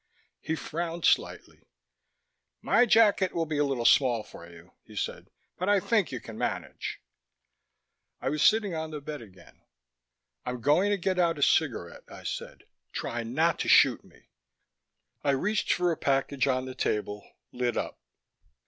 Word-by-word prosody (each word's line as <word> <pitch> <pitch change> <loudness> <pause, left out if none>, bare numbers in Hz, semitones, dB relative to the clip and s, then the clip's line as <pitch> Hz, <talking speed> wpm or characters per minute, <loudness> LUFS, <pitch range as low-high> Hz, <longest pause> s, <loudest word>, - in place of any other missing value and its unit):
He 160 - -3
frowned 165 +2 -4
slightly. - - 0 1.0
"My 245 - +3
jacket 210 -4 +4
will 165 -1 0
be 155 -2 -2
a - - +4
little 135 -4 -1
small 120 -5 +4
for 85 -4 -13
you," 85 +1 -16
he - - -15
said. - - -4 0.3
"But 185 +2 -1
I 205 -1 +5
think 210 - +1
you 130 - -4
can 110 -1 -10
manage." - - -4 1.2
I - - -2
was 150 0 -2
sitting 215 -1 +4
on 160 -1 -3
the 155 -1 -6
bed 150 0 -7
again. 95 -5 -17 0.8
"I'm 125 0 -4
going 150 - +3
to 205 - +1
get 185 0 -1
out 170 -2 +2
a 145 - 0
cigarette," 120 - 0
I - - -11
said. - - -6 0.3
"Try 120 0 -3
not 155 +9 0
to - - -2
shoot - - +5
me." - - -21 1.0
I 140 - +2
reached 210 +8 0
for 180 -1 +2
a 160 - -2
package 135 -1 0
on 130 -1 0
the 130 - -6
table, 105 -4 -2 0.3
lit 125 -1 -1
up. - - -4
150 Hz, 165 wpm, -28 LUFS, 125-175 Hz, 1.2 s, I